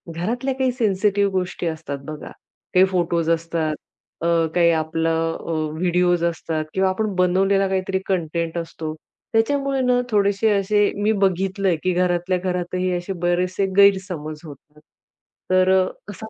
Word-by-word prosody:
घरातल्या 240 +9 -2
काही 260 -1 +1
सेन्सिटिव्ह 205 -3 +1
गोष्टी 180 -2 -2
असतात 160 -3 -4
बघा, 155 -1 -8 0.4
काही 185 +1 +6
फोटोज 170 -3 0
असतात, 165 -2 -1 0.5
अ, 170 - 0 0.3
काही 170 -1 +5
आपलं 165 +1 0
अ, 170 - -3 0.3
व्हिडिओज 175 -1 +2
असतात 160 -2 -2
किंवा 190 0 +2
आपण 205 0 -2
बनवलेला 195 +2 +2
काहीतरी 190 0 -1
कंटेंट 170 -2 -2
असतो. 160 -2 -5 0.4
त्याच्यामुळे 275 +4 +1
ना, 250 -1 +2
थोडेसे 205 0 +2
असे 205 +1 +2
मी 215 - +3
बघितलंय, 190 0 +1
की 185 -1 +1
घरातल्या 180 0 +1
घरातही 180 0 -2
असे 175 +2 -5
बरेचसे 180 +2 +1
गैरसमज 185 -6 +2
होतात. 150 +1 -14 0.7
तर 185 0 +4
अ, - - +1 0.3
असा 220 - -9
185 Hz, 135 wpm, -22 LUFS, 170-195 Hz, 0.7 s, काही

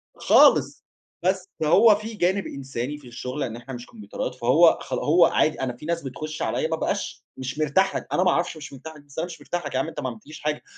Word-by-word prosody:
خالص. - - +4 0.4
بس 190 +1 0
هو 205 +8 +6
فيه 215 +1 -7
جانب 190 +3 +1
إنساني 135 +1 -5
في 140 -4 -15
الشغل 125 +4 -5
إن 115 -3 -4
إحنا 125 +3 -9
مش 120 0 -7
كومبيوترات 105 +4 -6
فهو 130 +8 +5
خلا - - -3
هو 170 +3 +5
عادي. 155 -2 +1
أنا 130 -2 -1
فيه 150 +6 -11
ناس 170 0 -1
بتخُش 155 +4 -6
عليّا - - 0
ما - - -1
أبقاش - - -3
مش 130 +3 -5
مرتاح 155 +6 +2
لك. - - -4
أنا 185 - +3
ما 180 - +4
أعرفش 170 -1 -1
مش 145 -2 -9
مرتاح 155 +4 -10
لك، 145 - -15
بس 145 +1 -9
أنا 165 - 0
مش 175 -2 -10
مرتاح 175 -3 -4
لك 145 - -5
يا 130 - +2
عم 145 - -1
أنت 165 - -7
ما 130 -3 -2
عملتليش 125 +7 -11
حاجة. 150 0 -2
150 Hz, 240 wpm, -24 LUFS, 130-170 Hz, 0.4 s, هو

